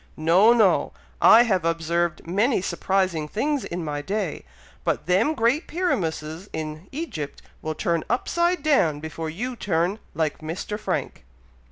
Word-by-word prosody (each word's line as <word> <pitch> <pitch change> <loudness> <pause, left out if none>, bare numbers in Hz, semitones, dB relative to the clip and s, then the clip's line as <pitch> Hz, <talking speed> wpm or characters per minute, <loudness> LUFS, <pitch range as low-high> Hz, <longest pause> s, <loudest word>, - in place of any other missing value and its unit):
No! 175 +8 +5
no! 220 -5 +3 0.3
I 230 - +8
have 190 -8 +1
observed 165 0 -1
many 205 +9 +2
surprising 185 -3 0
things 275 - -1
in 170 -1 -4
my 145 -1 -3
day, 195 +2 -3 0.4
but - - -1
them 185 - +2
great 245 +7 +1
pyramuses 175 - -2
in 155 +2 -5
Egypt 265 - -5 0.2
will 155 0 -3
turn 170 0 0
upside 345 +9 +1
down 175 - +3
before 160 +1 -5
you 245 +10 -4
turn 185 0 0 0.2
like 155 -1 -1
Mr. 170 +6 -5
Frank." - - -3
180 Hz, 140 wpm, -24 LUFS, 160-230 Hz, 0.4 s, I